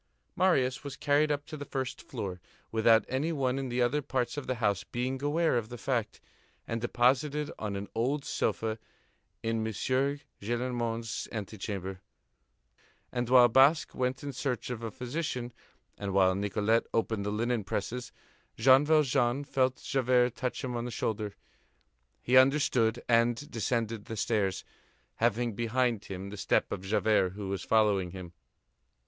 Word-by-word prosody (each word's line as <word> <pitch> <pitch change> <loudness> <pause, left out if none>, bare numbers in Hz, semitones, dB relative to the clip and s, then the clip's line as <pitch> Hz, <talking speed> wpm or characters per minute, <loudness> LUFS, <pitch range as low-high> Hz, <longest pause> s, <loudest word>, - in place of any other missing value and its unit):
Marius 135 -9 +2
was 140 -2 -6
carried 150 +1 +2
up 145 0 -2
to 155 - -8
the 145 - -6
first 135 -2 -4
floor, 95 -8 -6 0.3
without 110 -1 +4
any 140 +6 -1
one 135 -4 0
in 135 -2 -3
the 125 0 +1
other 140 +5 +1
parts 130 -2 -2
of 145 - -5
the 130 - 0
house 100 -4 0
being 130 +2 -3
aware 150 -2 +2
of 110 -1 -8
the 120 - -7
fact, 120 -2 -2 0.5
and 115 0 -3
deposited 140 +5 +1
on 105 -2 -3
an 100 +1 -4
old 135 +5 0
sofa 110 0 -1 0.6
in 115 0 0
M. 110 0 -1
Gillenormand's 120 -2 -2
antechamber; 95 -3 -5 1.1
and 120 -1 -2
while 125 -1 +8
Basque 135 +6 +4
went 125 +1 -2
in 140 -1 -4
search 125 -1 -3
of 120 -2 -4
a 115 - -3
physician, 125 0 -4 0.5
and 100 -1 -3
while 95 -1 +5
Nicolette 105 +3 +1
opened 110 -2 0
the 100 - -2
linen 115 +2 0
presses, 115 +5 -4 0.5
Jean 130 +1 +6
Valjean 140 -4 +2
felt 130 -2 0
Javert 125 -2 +2
touch 130 +2 -3
him 125 -2 -3
on 120 0 -2
the - - -3
shoulder. 105 -3 -3 0.9
He 130 +1 +4
understood 130 -4 +3
and 120 +4 +2
descended 115 -1 -1
the 110 - -6
stairs, 100 -4 0 0.5
having 120 +1 +1
behind 120 0 0
him 95 +1 -6
the 105 - -7
step - - +1
of - - -3
Javert 100 -2 +2
who 100 -1 -6
was 95 -2 -2
following 105 -5 +2
him. 90 -1 -9
120 Hz, 155 wpm, -30 LUFS, 110-130 Hz, 1.1 s, while